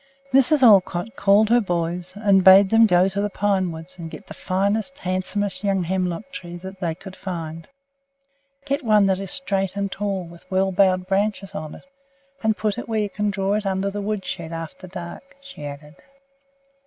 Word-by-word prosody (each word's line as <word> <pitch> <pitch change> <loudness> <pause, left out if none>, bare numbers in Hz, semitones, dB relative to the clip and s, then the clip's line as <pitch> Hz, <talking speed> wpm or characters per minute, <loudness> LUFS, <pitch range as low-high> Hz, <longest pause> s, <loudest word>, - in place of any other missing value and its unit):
Mrs. 270 +2 +4
Olcott 200 0 +4
called 205 -2 +4
her 240 +1 +5
boys, 175 -1 -3
and 200 -2 +3
bade 190 +1 +8
them 225 0 +6
go 180 -1 +4
to 195 +1 -2
the 205 - -1
pine 195 -2 0
woods 165 +3 -10
and 165 -1 -6
get - - -10
the - - -10
finest, 205 +8 -1
handsomest 195 0 -2
young 195 -2 +1
hemlock 185 +6 -2
tree 175 -10 -7
that 190 +2 -10
they 170 -4 -2
could 190 +2 -11
find. 165 -3 -6 1.0
"Get 280 +1 -1
one 215 -3 +4
that 190 -1 +1
is 195 -1 -6
straight 195 -7 -1
and 200 -1 -2
tall, 195 -2 -2
with 170 0 -14
well 190 0 +1
boughed 185 -1 +3
branches 195 0 -1
on 155 -5 -6
it, - - -15 0.6
and 220 -1 +1
put 215 +3 -1
it 245 - -8
where 225 - -1
you 205 -1 -3
can 210 0 -1
draw 195 0 -1
it 210 0 -1
under 195 +1 -1
the 205 +1 -4
wood 205 -2 -3
shed 170 -3 -5
after 165 +3 -7
dark," 180 +10 -9
she 275 - -11
added. 150 +2 -10
195 Hz, 190 wpm, -22 LUFS, 180-210 Hz, 1.0 s, bade